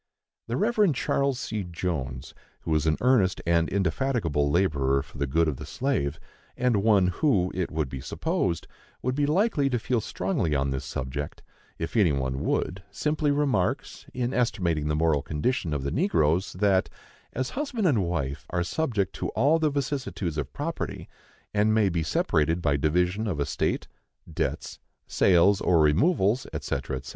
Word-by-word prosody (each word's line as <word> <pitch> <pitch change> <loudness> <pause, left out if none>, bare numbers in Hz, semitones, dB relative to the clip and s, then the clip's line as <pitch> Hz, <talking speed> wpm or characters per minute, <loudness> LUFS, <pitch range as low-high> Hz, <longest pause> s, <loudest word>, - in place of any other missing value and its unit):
The 120 +2 -2
Reverend 210 - +2
Charles 140 0 0
C. 110 -8 -3
Jones, 70 -7 -4 0.3
who - - -4
was 80 0 +2
an 80 - +2
earnest 120 -8 +3
and 85 -1 +2
indefatigable 95 - 0
laborer 70 -6 +2
for - - -13
the 70 - 0
good 80 +5 +2
of 75 -4 -1
the - - -7
slave, 80 - -1 0.4
and 125 -3 +2
one 105 -3 +4
who, 95 - +1
it 90 -1 -2
would 80 -3 -1
be 65 0 -6
supposed, 85 +5 -1 0.4
would 130 - 0
be 145 +1 +1
likely 155 -4 +2
to 125 - +1
feel 115 +1 0
strongly 90 -6 -1
on 70 0 0
this 65 -1 -3
subject, 70 +3 -5 0.3
if 80 - -5
any 100 -8 +4
one 65 -1 -1
would, 95 - -1
simply 150 0 0
remarks, 140 -10 0
in 125 0 -2
estimating 85 -11 0
the 75 - 0
moral 80 -2 +2
condition 80 +3 -1
of 70 -2 -2
the 70 - -2
negroes, 90 - +1
that, 95 0 +2 0.4
as 130 +1 -2
husband 260 -7 -2
and 125 - +3
wife 80 -6 -3
are 90 0 0
subject 105 - -1
to - - -2
all 145 +8 +4
the 155 -1 +2
vicissitudes 135 - -3
of 70 -3 -4
property, - - -4 0.5
and 105 +1 +3
may 105 -3 +3
be 85 -2 -1
separated 80 +1 +1
by 75 -4 +1
division 90 +9 +1
of 90 -8 -2
estate, 70 - -1 0.5
debts, - - -3 0.3
sales 95 +2 +4
or 85 -2 +3
removals, 100 - +3
&c. - - -3
&c. 65 - -2
90 Hz, 165 wpm, -26 LUFS, 75-125 Hz, 0.5 s, one